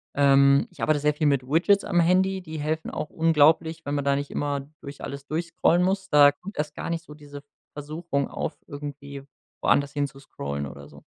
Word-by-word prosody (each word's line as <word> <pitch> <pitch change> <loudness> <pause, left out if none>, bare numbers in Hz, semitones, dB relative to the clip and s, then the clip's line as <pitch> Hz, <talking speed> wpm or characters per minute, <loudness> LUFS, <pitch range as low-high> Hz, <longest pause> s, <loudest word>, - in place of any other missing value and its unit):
Ähm, 140 0 +5
ich - - -13
arbeite 155 -1 +2
sehr 150 +1 +2
viel 150 +1 0
mit 140 -3 +2
Widgets 185 +7 +3
am 175 - +1
Handy, 185 +2 +2
die 160 -3 -7
helfen 155 +2 -2
auch 150 - -5
unglaublich, 160 0 +3
wenn 145 - -3
man 145 - -1
da 140 - +3
nicht 140 0 -4
immer 145 -1 -2 0.2
durch 140 0 -10
alles 140 0 -7
durchscrollen 170 +2 +1
muss. 190 +1 -1
Da 145 -1 +7
kommt 200 +7 -11
erst 150 -1 -2
gar - - -5
nicht 165 0 -3
so 150 - -12
diese 145 -1 -11 0.3
Versuchung 145 -1 -3
auf, - - -4
irgendwie 140 -2 -8 0.4
woanders 140 0 +2
hinzuscrollen 135 - -4
oder 70 +1 -10
so. 70 -1 -16
145 Hz, 195 wpm, -25 LUFS, 140-165 Hz, 0.4 s, Da